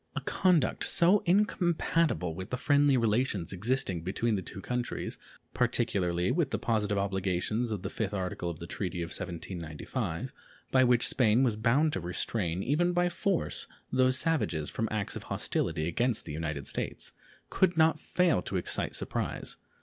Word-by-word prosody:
A - - -2
conduct 180 -4 +2
so 185 +4 +5
incompatible 170 - +2
with 95 +3 -7
the 125 - -2
friendly 145 0 +4
relations 110 -5 +1
existing 100 -3 0
between 105 +6 -1
the 95 - -1
two 95 - -7
countries, 125 +4 -3 0.3
particularly 90 -1 +1
with 160 +3 +1
the - - -1
positive 105 -3 0
obligations 100 +4 -1
of 105 -4 -3
the - - -3
5th 105 -3 -2
article 90 -3 -3
of 85 - -5
the 85 - -8
treaty 90 -1 -3
of 85 - -6
1795, 85 - -4 0.4
by 130 0 +5
which 125 -1 +4
Spain 120 0 +3
was 120 -5 +2
bound 130 +8 +2
to - - -1
restrain, 90 +1 -2
even 175 +7 +2
by 175 0 +2
force, 185 +1 -1 0.2
those 130 0 +3
savages 90 - 0
from 115 - -1
acts 105 -2 -2
of - - -5
hostility 80 -1 -1
against 120 +7 0
the - - -6
United 75 -3 -3
States, - - -4 0.4
could 180 -3 +2
not 160 0 +4
fail 180 -2 +2
to 95 - -3
excite 90 - -1
surprise. - - -3
110 Hz, 160 wpm, -30 LUFS, 90-145 Hz, 0.4 s, so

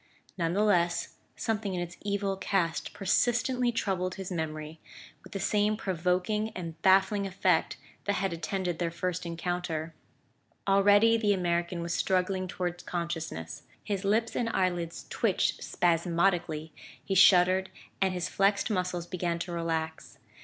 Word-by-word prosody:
None 170 -2 0
the 205 +3 +2
less, 175 -5 +2 0.3
something 210 -4 -2
in - - -2
its 175 0 -5
evil 200 -1 -1
cast 185 -4 -1
persistently 240 +5 +1
troubled 185 -5 -1
his 190 -1 -6
memory, 155 -2 -4 0.4
with - - -14
the 195 - -4
same 210 +2 +1
provoking 185 +3 0
and 165 -3 -6
baffling 195 +2 +4
effect 190 +1 +1 0.3
that 205 - +1
had 195 -2 -1
attended 175 +1 -2
their 170 -1 0
first 175 +1 -3
encounter. 170 -1 -3 0.7
Already 205 +3 +5
the 210 -2 +2
American 175 -1 -1
was 170 0 -2
struggling 185 0 0
toward 175 -1 -4
consciousness. 160 - -4 0.2
His 200 -2 -2
lips 220 +3 +1
and 230 - 0
eyelids 175 -4 -1
twitched - - +1
spasmodically, 170 -2 +1 0.3
he 195 - -1
shuddered, 185 0 +6 0.3
and 190 -1 +3
his 180 -1 -2
flexed 200 +3 +1
muscles 180 -3 -1
began 175 -1 -2
to 170 +1 -5
relax. 165 -1 -3
180 Hz, 140 wpm, -29 LUFS, 170-195 Hz, 0.7 s, shuddered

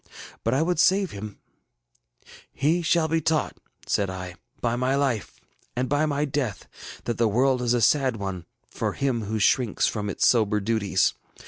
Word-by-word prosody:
But 115 +3 +1
I 145 - +2
would 175 -1 0
save 190 0 +3
him. 105 0 -8 1.2
ŌĆ£ŌĆśHe 160 +5 +2
shall 165 0 +3
be 165 +1 0
taught, 155 0 0
ŌĆÖ - - -28 0.3
said 100 -2 +1
I, 90 -1 -6 0.3
ŌĆśby 120 0 0
my 130 +2 +1
life, 135 -7 -1 0.4
and 125 +1 -1
by 145 +3 +1
my 145 0 0
death, 135 -6 -3 0.4
that 120 - -3
the 115 - +4
world 125 +4 +2
is 120 0 +2
a 120 - +1
sad 130 +2 +3
one 95 -4 -5 0.2
for - - -2
him 125 -5 -1
who 110 +2 -2
shrinks 115 +1 +2
from 105 -2 -2
its - - 0
sober 105 -3 +3
duties. 100 -3 +1
125 Hz, 180 wpm, -25 LUFS, 105-145 Hz, 1.2 s, the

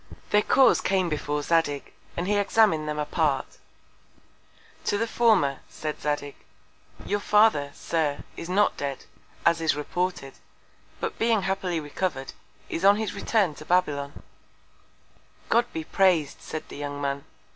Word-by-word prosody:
Their 210 - +5
Cause 265 +5 +4
came 185 -2 +1
before 150 -1 -2
Zadig, 145 -3 0 0.2
and 175 +2 -2
he 205 - +2
examin'd 200 -6 +3
them 150 - -3
apart. 150 -2 -1 1.3
To 205 - +1
the 230 - 0
former, 215 - +2
said 155 -1 -5
Zadig, 145 -1 -2 0.7
Your 205 +1 0
Father, 210 -9 +3
Sir, 155 -4 -1
is 165 - -7
not 205 +3 +2
dead, 140 -2 -4 0.4
as 170 0 +3
is 160 -3 +2
reported, 150 -1 -3 0.7
but 455 -1 -4
being 225 -3 +2
happily 190 -3 -1
recover'd, 145 -2 -3 0.3
is 165 - -4
on 200 +1 +7
his 220 -1 -2
Return 200 -4 +1
to 150 - -11
Babylon. 150 -5 0 1.3
God 240 +1 +2
be 160 - -4
praised, 175 -4 +2
said 155 - -5
the - - -9
young 145 0 -5
Man! 140 0 -2
165 Hz, 140 wpm, -26 LUFS, 145-200 Hz, 1.3 s, on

